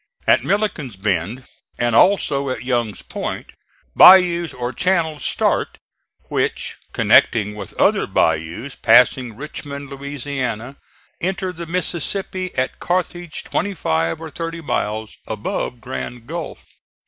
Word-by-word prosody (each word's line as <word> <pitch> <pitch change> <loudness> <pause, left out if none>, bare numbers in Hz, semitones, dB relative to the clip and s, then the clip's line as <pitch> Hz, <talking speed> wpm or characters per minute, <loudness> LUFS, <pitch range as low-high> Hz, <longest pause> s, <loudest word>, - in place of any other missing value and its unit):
At - - +4
Milliken's 195 - -1
Bend, 100 +5 -2 0.3
and 120 -1 +1
also 140 - +3
at 130 - -3
Young's 120 -5 -1
Point, - - -5 0.4
bayous 175 -3 +7
or 125 0 -4
channels 165 -5 0
start, - - 0 0.5
which - - -2
connecting 105 -2 +4
with 100 -3 -9
other - - +3
bayous 85 - 0
passing 120 0 +4
Richmond, 140 -1 -7
Louisiana, 135 -3 -4 0.4
enter 185 +1 -1
the 170 -1 -7
Mississippi 185 +2 -2
at 130 0 -1
Carthage 175 -2 -2
twenty 200 -1 -2
five 80 - 0
or 160 -1 -8
thirty 165 +1 -5
miles 110 -7 -3
above - - -3
Grand 115 - -6
Gulf. 165 +5 -6
140 Hz, 115 wpm, -20 LUFS, 115-170 Hz, 0.5 s, bayous